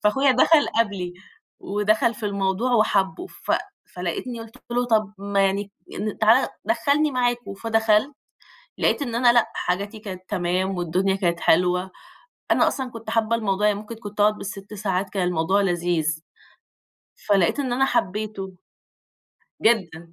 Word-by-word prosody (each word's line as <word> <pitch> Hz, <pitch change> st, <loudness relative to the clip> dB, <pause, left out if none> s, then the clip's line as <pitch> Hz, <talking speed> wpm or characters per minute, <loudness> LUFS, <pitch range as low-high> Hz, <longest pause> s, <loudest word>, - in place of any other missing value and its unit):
فأخويا 270 Hz, +7 st, +3 dB
دخل 295 Hz, +4 st, +4 dB
قبلي، 190 Hz, -5 st, -2 dB, 0.5 s
ودخل 215 Hz, +4 st, +1 dB
في 210 Hz, -1 st, -4 dB
الموضوع 200 Hz, +4 st, 0 dB
وحبه، 215 Hz, -, +1 dB
ف -, -, -4 dB, 0.4 s
فلقيتني 185 Hz, +7 st, -4 dB
قلت 225 Hz, 0 st, -11 dB
له 245 Hz, +1 st, +1 dB
طب 215 Hz, -3 st, +1 dB
ما 200 Hz, 0 st, -1 dB
يعني 200 Hz, +1 st, -2 dB, 0.2 s
أ 210 Hz, +1 st, -2 dB
تعالَ 225 Hz, +4 st, +5 dB, 0.2 s
دخلني 295 Hz, +1 st, +2 dB
معاكم 245 Hz, -4 st, -1 dB
فدخلت، 225 Hz, +4 st, +2 dB, 0.7 s
لقيت -, -, +1 dB
إن 240 Hz, -4 st, -3 dB
أنا 240 Hz, 0 st, +5 dB
لأ، 240 Hz, -2 st, +3 dB
حاجاتي 200 Hz, +4 st, -2 dB
كانت 185 Hz, -3 st, -8 dB
تمام 185 Hz, 0 st, -1 dB
والدنيا 180 Hz, +3 st, 0 dB
كانت 175 Hz, -3 st, 0 dB
حلوة، 180 Hz, +2 st, +2 dB, 0.6 s
أنا -, -, +4 dB
أصلًا 260 Hz, -3 st, -4 dB
كُنت 225 Hz, -1 st, -8 dB
حابة 225 Hz, 0 st, +1 dB
الموضوع 210 Hz, -2 st, 0 dB
يعني 205 Hz, -, 0 dB
ممكن 215 Hz, +2 st, -8 dB
كُنت 210 Hz, -1 st, -8 dB
أقعد 210 Hz, +1 st, +3 dB
بال6 195 Hz, +1 st, -7 dB
ساعات 195 Hz, -2 st, -2 dB
كان 185 Hz, -3 st, 0 dB
الموضوع 180 Hz, +3 st, +1 dB
لذيذ، 170 Hz, -4 st, 0 dB, 1.0 s
فلقيت 200 Hz, +5 st, +2 dB
إن 255 Hz, -3 st, -1 dB
أنا 270 Hz, +2 st, +3 dB
حبيته. 200 Hz, -3 st, -2 dB, 1.1 s
جدًا. 170 Hz, -7 st, +1 dB
205 Hz, 145 wpm, -23 LUFS, 190-230 Hz, 1.1 s, تعالَ